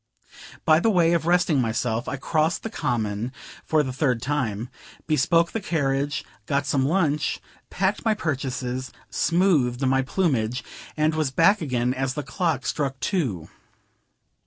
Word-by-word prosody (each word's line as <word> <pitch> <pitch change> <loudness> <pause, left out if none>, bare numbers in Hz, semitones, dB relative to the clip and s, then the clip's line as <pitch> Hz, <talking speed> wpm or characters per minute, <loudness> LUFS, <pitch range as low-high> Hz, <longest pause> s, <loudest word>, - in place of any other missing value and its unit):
By 155 0 +6
way 175 -5 +3
of 165 -1 0
resting 175 -5 +3
myself, 115 +1 -1
I - - -2
crossed 155 +4 0
the 225 - -4
Common, 110 - -2 0.3
for 155 -1 +2
the 130 -2 -4
third 130 -3 +1
time, 120 -4 -2 0.4
bespoke 165 +3 +2
the 225 - -3
carriage, 145 -3 -1 0.2
got 140 0 0
some 135 -2 +1
lunch, 155 -3 +1 0.3
packed 190 +2 0
my 220 -2 +2
purchases, 130 -6 -3 0.2
smoothed 150 -8 +2
my 135 0 +3
plumage, 130 - 0 0.3
and 155 +1 +2
was 155 -3 0
back 165 +9 +4
again, 125 -4 0
as 130 0 -2
the 150 - -3
clock 160 -9 -1
struck 135 -3 -2
two. 120 - -1
140 Hz, 140 wpm, -24 LUFS, 125-165 Hz, 0.4 s, By